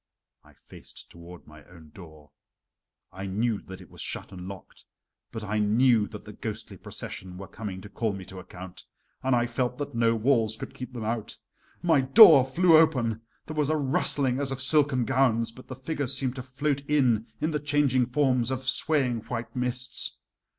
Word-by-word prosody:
I - - -20
faced - - -13
toward 85 +1 -13
my 75 -1 -15
own 80 -4 -16
door. 80 -5 -14 0.8
I 95 +1 -6
knew 105 +3 -1
that 95 0 -11
it - - -16
was - - -10
shut - - -5
and 90 -1 -8
locked, 95 -1 -11 0.5
but 110 - -6
I 105 +1 -1
knew 110 +1 +3
that - - -10
the - - -10
ghostly - - -6
procession 90 -1 -8
were 95 0 -8
coming 100 -4 -7
to 105 - -10
call 110 +1 -1
me 95 -1 -7
to 95 0 -10
account, 90 0 -10 0.4
and 130 -1 +2
I 120 0 +2
felt 125 +1 -2
that 145 - -5
no 115 0 +2
walls 110 -2 +1
could - - -8
keep 125 - -8
them 120 -3 -5
out. 115 -1 -3 0.5
My 165 -5 +4
door 145 - +9
flew 165 +6 +4
open, 125 -9 +2 0.2
there 155 - -7
was 150 -1 +1
a 155 - +2
rustling 140 -3 +1
as 140 -1 0
of 135 - -4
silken 135 -2 +2
gowns, 125 -4 +2
but 130 +3 -15
the 130 - -7
figures 140 -1 -2
seemed 130 -2 -2
to - - -3
float 140 +2 -2
in 125 -7 +2
in 155 +2 -1
the 150 - -1
changing 140 -4 +2
forms 125 -2 +1
of 130 0 -3
swaying 130 -2 +1
white 120 0 -5
mists. 125 0 -2
125 Hz, 190 wpm, -27 LUFS, 105-135 Hz, 0.8 s, door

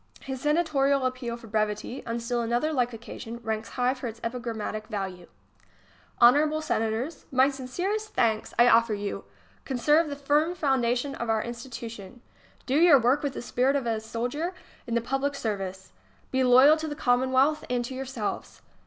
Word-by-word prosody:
His 265 -1 -6
senatorial 285 -3 +2
appeal 255 -2 -3
for 235 - -14
brevity, 215 +3 -2
on 230 +1 -2
still 240 +1 -1
another 240 +7 0
like 245 -3 +1
occasion, 230 0 -8
ranks 220 0 -3
high 250 +1 +1
for 255 -2 -6
its 225 0 -8
epigrammatic 225 -3 -4
value: 190 -5 -5 0.9
Honorable 295 +6 +5
Senators, 250 0 -2
my 265 +1 +4
sincere 320 +11 -2
st 430 0 -12
thanks 220 -2 +1
I 240 - +6
offer 230 -2 +4
you. 205 0 -5 0.4
Conserve 295 +5 +2
the 285 - -4
firm 295 +4 +1
foundation 265 -3 0
of 235 -4 -4
our 220 -1 +1
institutions. 235 -3 -8 0.5
Do 270 +2 +1
your 335 -4 +7
work 250 +3 +2
with 285 -2 -2
the - - -6
spirit 255 +3 +1
of 275 -3 -1
a 225 -2 0
soldier 245 +11 -3 0.3
in 235 - -2
the 235 - +2
public 270 +4 -1
service. 195 -6 -4 0.4
Be 260 0 +2
loyal 260 +5 +7
to 315 0 -4
the 295 - -4
Commomvealth 260 +4 +2
and 245 -1 0
to 260 - -6
yourselves. 260 -5 -5
250 Hz, 170 wpm, -27 LUFS, 230-280 Hz, 0.9 s, your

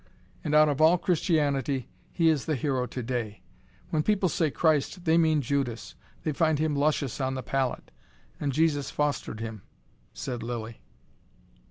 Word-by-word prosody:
And 150 -1 0
out 155 0 +7
of 145 0 0
all 165 +3 +6
Christianity 145 -7 0 0.2
he 165 -2 +2
is 150 -4 +1
the 155 - 0
hero 130 -1 -1
today. 120 -3 -4 0.5
When 155 - +2
people 195 +1 +2
say 160 -1 +1
Christ 160 +4 +1
they 160 0 +4
mean 160 -3 +3
Judas. 125 -3 -2 0.3
They 155 - 0
find 155 +1 +2
him 155 0 0
luscious 140 -2 0
on 130 0 -1
the 130 - -4
palate. 135 -2 -2 0.5
And 145 -2 -1
Jesus 145 -1 +1
fostered 145 -6 -2
him 110 -3 -6 0.3
" - - -36
said 115 - -4
Lilly. 115 -1 -5
145 Hz, 160 wpm, -27 LUFS, 125-155 Hz, 0.5 s, out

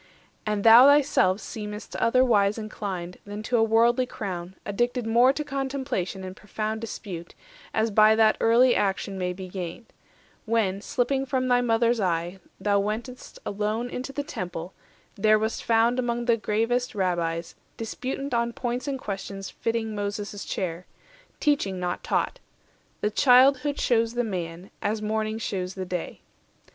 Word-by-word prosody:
And 210 -1 0
thou 230 +4 +9
thyself 270 -10 +4
seem'st 210 -2 -7
otherwise 230 -4 +3
inclined 195 -5 -5
Than 205 +1 -7
to 240 +2 +1
a 225 - +4
worldly 235 +3 +3
crown, 185 -5 -6
addicted 240 +4 -1
more 240 +3 +5
To 300 +2 -3
contemplation 265 -10 -3
and 185 0 -7
profound 215 +2 -4
dispute; 185 -6 -7 0.4
As 220 0 +1
by 215 +1 +6
that 220 -1 +4
early 240 +2 +5
action 195 -1 -1
may 180 0 -1
be 185 +1 -7
judged, 180 +4 -7 0.5
When, 215 -4 0
slipping 265 +4 0
from 255 0 0
thy 245 0 +4
mother's 235 0 +2
eye, 175 -1 -1 0.2
thou 205 -1 +2
went'st 225 +5 -4
Alone 215 +4 -2
into 255 +2 -5
the 285 +1 -3
Temple, 180 - -6 0.4
there 215 +1 +5
wast 220 +1 -2
found 230 +2 +3
Among 240 -1 -1
the 235 -1 +4
gravest 230 +3 -1
Rabbies, 170 -3 -1 0.2
disputant 260 +4 -4
On 235 0 0
points 245 +3 -3
and 275 -1 -1
questions 195 -3 -6
fitting 225 -1 -2
Moses' 205 0 -4
chair, 175 -1 -4 0.5
Teaching, 235 -11 +1
not 180 0 -3
taught. - - -1 0.6
The 210 - 0
childhood 270 +4 +5
shews 230 -1 +1
the 245 - +1
man, 180 -3 -5
220 205 - 0
As 220 - -5
morning 215 0 -1
shews 190 -4 -3
the 190 -1 -4
day. 180 -2 -5
220 Hz, 150 wpm, -26 LUFS, 195-245 Hz, 0.6 s, thou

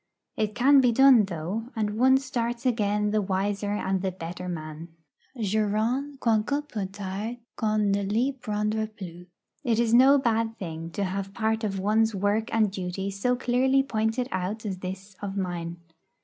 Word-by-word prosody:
It 215 -1 -1
can 270 +3 +6
be 250 -2 +4
done, 255 -3 +6
though; 185 +5 -4
and 210 -2 -1
one 260 +1 +6
starts 245 -2 -3
again 210 -3 +1
the 215 0 +2
wiser 200 +1 -1
and 190 -2 -1
the 190 -1 -1
better 180 +1 -6
man. 155 -1 -6 0.5
'Jurant, 220 +7 0
quoiqu'un 240 +6 +1
peu 210 -8 -3
tard, 200 +4 -5 0.2
qu'on 215 -2 +1
ne 200 +1 +1
l'y 220 +7 +1
prendra 215 -3 -2
plus.' 180 -5 -10 0.4
It 235 -5 +1
is 235 -1 +2
no 265 +4 +7
bad 225 -3 0
thing 165 -2 -6
to 200 - -1
have 195 +1 -3
part 220 0 0
of 195 -2 -1
one's 215 +2 +2
work 205 +3 0
and 215 -3 +2
duty 190 +1 -4
so 225 +6 0
clearly 260 +2 +2
pointed 225 0 -1
out 190 +4 -3
as 190 -3 -3
this 190 +2 -7
of 200 -1 -4
mine. 175 -2 -3
210 Hz, 165 wpm, -26 LUFS, 195-235 Hz, 0.5 s, no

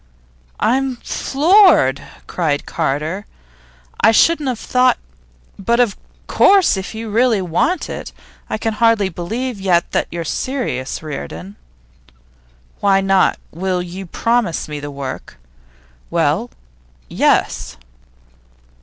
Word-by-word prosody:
'I'm 260 +3 +1
floored!' 305 - +4 0.2
cried 150 -5 -1
Carter. 160 +5 -2 0.8
'I 220 - +7
shouldn't 305 +3 +3
have 250 - -2
thought 250 +2 +2 0.6
but 235 +5 +1
of 235 -5 +2 0.3
course, 390 - +4
if 190 +3 -6
you 220 -1 -6
really 230 -1 +3
want 190 - 0
it. - - -7 0.4
I - - -2
can 225 0 -2
hardly 225 -3 +2
believe 220 +6 -4
yet 180 -3 +1
that - - 0
you're 170 -1 -5
serious, 160 - -3
Reardon.' 95 - -7 1.2
'Why 195 -1 +3
not? 195 -1 +2
Will 180 +1 -2
you 180 +2 -8
promise 230 -2 0
me 150 -1 -5
the 145 0 -6
work?' 140 -2 -7 0.7
'Well, 170 +7 0 0.6
yes. - - 0
195 Hz, 110 wpm, -18 LUFS, 165-245 Hz, 1.2 s, I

